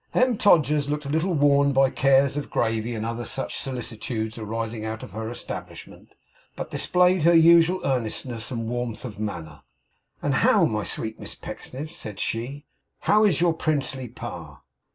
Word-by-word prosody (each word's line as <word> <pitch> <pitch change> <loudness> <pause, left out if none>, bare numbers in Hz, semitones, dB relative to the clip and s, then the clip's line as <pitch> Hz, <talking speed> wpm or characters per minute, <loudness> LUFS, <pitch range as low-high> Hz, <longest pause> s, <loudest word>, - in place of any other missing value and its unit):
M. 255 -1 +3
Todgers 150 -8 +3
looked 150 0 -2
a - - -5
little 165 +4 +1
worn 140 -1 +4
by 135 0 +4
cares 135 0 +3
of 145 - -4
gravy 115 +1 -1
and 110 0 -3
other 115 +1 -3
such - - -2
solicitudes 115 -3 -4
arising 110 0 -4
out 110 0 -5
of - - -9
her 110 +2 -5
establishment, 120 - -8 0.4
but - - -6
displayed 180 0 +3
her 170 +2 +5
usual 170 +2 +6
earnestness 120 -2 -2
and 115 -4 -4
warmth 120 0 -4
of 105 -4 -8
manner. 85 -8 -5 0.6
'And - - -1
how, - - +4
my - - -1
sweet 110 0 -3
Miss - - -4
Pecksniff,' 145 +5 -7
said 105 - -6
she, 135 +6 -3 0.4
'how 215 +1 +4
is 175 -7 +2
your 175 -2 +3
princely 140 -5 -1
pa? - - -9
130 Hz, 165 wpm, -24 LUFS, 115-155 Hz, 0.6 s, usual